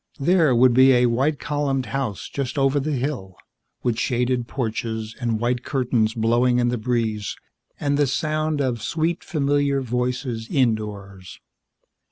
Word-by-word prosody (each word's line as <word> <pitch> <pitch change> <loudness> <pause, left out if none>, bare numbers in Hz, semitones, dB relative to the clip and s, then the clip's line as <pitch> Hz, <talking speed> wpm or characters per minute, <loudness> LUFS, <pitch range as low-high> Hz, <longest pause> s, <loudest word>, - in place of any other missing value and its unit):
There 155 -2 +3
would 125 +1 +5
be 130 +2 +6
a 125 0 +4
white 135 +6 +1
columned 140 -3 -1
house 130 -8 -3
just 135 -2 -4
over 135 +1 +2
the 150 +2 -2
hill, 125 -9 -3 0.5
with 120 -2 0
shaded 125 -1 0
porches 110 -3 -3
and 115 -2 0
white 120 +1 -1
curtains 120 -5 0
blowing 120 +2 +2
in 120 0 +2
the 120 -1 -2
breeze 110 -3 -1 0.4
and 145 0 0
the 145 - +3
sound 155 +2 -1
of 125 -4 -1
sweet, 165 - -1
familiar 145 -3 +1
voices 125 -2 -2
indoors. 105 -7 -2
125 Hz, 145 wpm, -23 LUFS, 115-140 Hz, 0.5 s, be